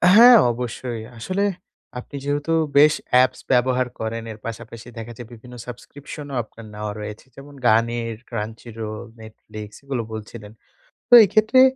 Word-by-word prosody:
হ্যাঁ, 240 +2 +10 0.2
অবশ্যই, 120 -1 -5 0.2
আসলে 185 - -2 0.6
আপনি 125 - -11
যেহেতু 145 +3 -1 0.2
বেশ 150 +1 +7 0.2
অ্যাপস 125 +1 +4
ব্যবহার 125 0 +3
করেন, 115 +1 -3
এর 110 - -9
পাশাপাশি 115 0 -8
দেখা 115 +1 -7
যায় 120 - -9
বিভিন্ন 125 +2 -12
সাবস্ক্রিপশনও 140 +3 -9
আপনার 110 +1 -14
নেওয়া 105 0 -4
রয়েছে, 105 +2 -7
যেমন 140 +1 -12
গানের, 115 +1 +2
Crunchyroll, 110 -1 -6 0.2
Netflix, 110 -1 -10
এগুলো 135 -3 -2
বলছিলেন। 105 -1 -8 0.6
তো - - +3
এক্ষেত্রে 215 +6 +4
120 Hz, 135 wpm, -22 LUFS, 110-140 Hz, 0.6 s, হ্যাঁ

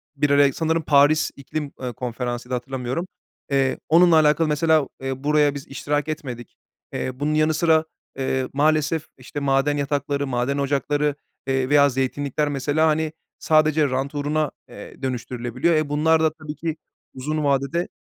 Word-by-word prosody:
Bir 145 0 +1
ara 140 -1 +4
sanırım 160 +2 0
Paris 145 +1 +4
İklim, 140 +1 -5
eee, 125 -1 -3
Konferansı'ydı, 125 0 -4
hatırlamıyorum. 130 +5 -3 0.4
Eee, 135 -1 +2
onunla 170 +1 +6
alakalı 155 +1 +3
mesela, 155 -1 +2
eee, 135 0 -4
buraya 150 -1 +3
biz 140 - -7
iştirak 145 +2 -2
etmedik. 125 -6 -6 0.4
Eee, - - -2
bunun 150 +1 0
yanı 155 +1 +2
sıra, 160 0 +3 0.3
eee, 130 -1 -1
maalesef, 155 +2 +1
işte, 130 +3 -7
maden 140 +1 +1
yatakları, 140 0 -1
maden 125 +2 -1
ocakları, 145 +1 0 0.3
eee, 130 -1 0
veya 145 -1 +5
zeytinlikler 140 +3 -1
mesela, 145 +3 +1
hani, 155 0 0 0.3
sadece 155 -1 +3
rant 135 +3 -2
uğruna, 150 +1 0 0.2
eee, - - -12
dönüştürülebiliyor. 125 +3 -1
Eee, 155 -2 0
bunlar 160 +2 +3
da 155 -1 +2
tabii 155 -2 -8
ki 160 -1 -3 0.4
uzun 150 +4 -3
vade 140 -1 +1
de 170 +1 0
145 Hz, 155 wpm, -23 LUFS, 135-155 Hz, 0.4 s, onunla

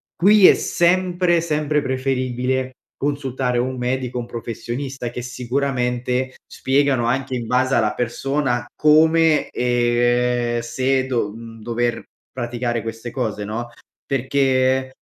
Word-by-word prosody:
qui 200 +2 +6
è - - +8
sempre, 175 0 +2
sempre 150 -2 0
preferibile 130 -1 -1 0.3
consultare 135 -3 -1
un 130 +2 -1
medico 125 0 -2
o - - -1
un 120 - -8
professionista, 120 +2 -5
che 125 - -6
sicuramente 125 0 -2
spiegano 135 -2 +1
anche 130 +2 -1
in 120 -2 -4
base 130 +1 +1
alla 105 -1 +2
persona 125 +1 -1
come 160 +1 +4
ehm, 120 0 +1
se 130 +2 0
do 120 -5 -1
mhmm, 115 0 -11
dover 120 +1 -1 0.3
praticare 120 -1 -3
queste 115 +1 -6
cose, 110 -5 -3
no, 115 +3 -4 0.4
perché 130 0 +1
130 Hz, 120 wpm, -21 LUFS, 120-135 Hz, 0.4 s, è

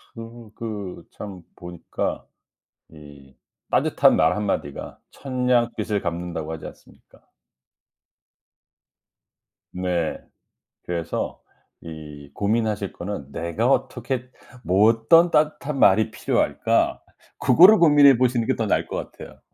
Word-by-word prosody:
그 115 -1 -11
그 100 -6 -7
참 95 -4 -9
보니까 85 -1 -5 0.7
이 70 -3 -15 0.4
따뜻한 - - +3
말 80 +5 +2
1 105 - -2
마디가 70 -7 -4
1000 130 -2 -5
냥 120 -2 +3
빚을 105 -1 -2
갚는다고 85 -2 -4
하지 80 - -7
않습니까? - - -17 2.5
네. 90 -3 -2 0.7
그래서 85 -2 -4 0.4
이 75 -3 -11
고민하실 105 -1 -1
거는 85 -7 -7
'내가 90 +8 -2
어떻게 125 -1 -2 0.4
뭐 100 +4 +4
어떤 140 +10 +4
따뜻한 150 -2 0
말이 110 0 +4
필요할까?' - - 0 0.4
그거를 190 +6 +7
고민해 145 -6 +6
보시는 120 -2 +1
게 130 - +1
더 110 - -2
나을 - - 0
것 - - -5
같아요. - - -13
105 Hz, 220 characters per minute, -23 LUFS, 85-120 Hz, 2.5 s, 그거를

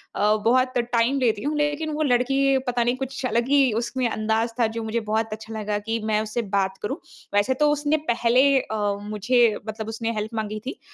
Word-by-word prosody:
अ, 210 +1 +3
बहुत 255 +2 +3 0.2
टाइम 235 +4 +2
लेती 225 -4 +1
हूँ, 300 +1 -1
लेकिन 295 +1 0
वो 310 +1 0
लड़की 270 +1 +2
पता 245 -1 +1
नहीं 245 +2 +1
कुछ 265 0 -4
अलग 235 0 0
ही 285 0 +5 0.2
उसमें 255 +1 -1
अंदाज़ 220 +2 0
था 230 - +4
जो 230 - -2
मुझे 220 +1 -1
बहुत 220 0 0
अच्छा 220 +1 -8
लगा 210 0 -2
कि 225 0 0
मैं 215 -1 +1
उससे 220 +2 -2
बात 190 -1 0
करूँ, 265 +8 -2 0.4
वैसे 205 +6 +3
तो 300 +3 +3
उसने 295 +1 +1
पहले 235 +2 +3 0.2
अ, 220 - -4 0.2
मुझे 215 +2 +2
मतलब 220 0 -5
उसने 225 +1 -3
हेल्प 215 +2 -4
माँगी 215 0 -5
थी। 365 - -5
235 Hz, 205 wpm, -24 LUFS, 215-265 Hz, 0.4 s, ही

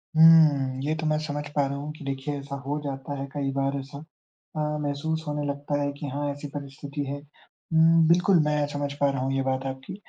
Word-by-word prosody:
हुँ, 155 -5 +6
ये 155 +2 0
तो 160 0 -4
मैं 155 0 +2
समझ 145 -1 -3
पा 145 -1 +3
रहा 140 0 -3
हूँ 145 +2 -5
कि 155 - -11
देखिए, 135 +1 -3
ऐसा 140 0 -6
हो 145 +2 -1
जाता 140 +1 -4
है, 135 - -3
कई 140 -2 -1
बार 135 0 0
ऐसा 135 +1 -8 0.6
अ, - - -2 0.2
महसूस 155 +3 -2
होने 150 0 -2
लगता 145 0 -2
है 145 - 0
कि 145 +1 -6
हाँ, 145 +2 -2
ऐसी 145 +1 -6
परिस्थिति 145 0 -6
है। 140 +1 -3 0.6
उम, 160 0 +6
बिल्कुल, 180 +2 +5
मैं 150 -1 +2
समझ 145 -1 -3
पा 140 - +5
रहा 135 -2 -2
हूँ 135 +1 0
ये 135 - +1
बात 130 0 -1
आपकी। 135 +7 -6
145 Hz, 220 wpm, -26 LUFS, 140-150 Hz, 0.6 s, हुँ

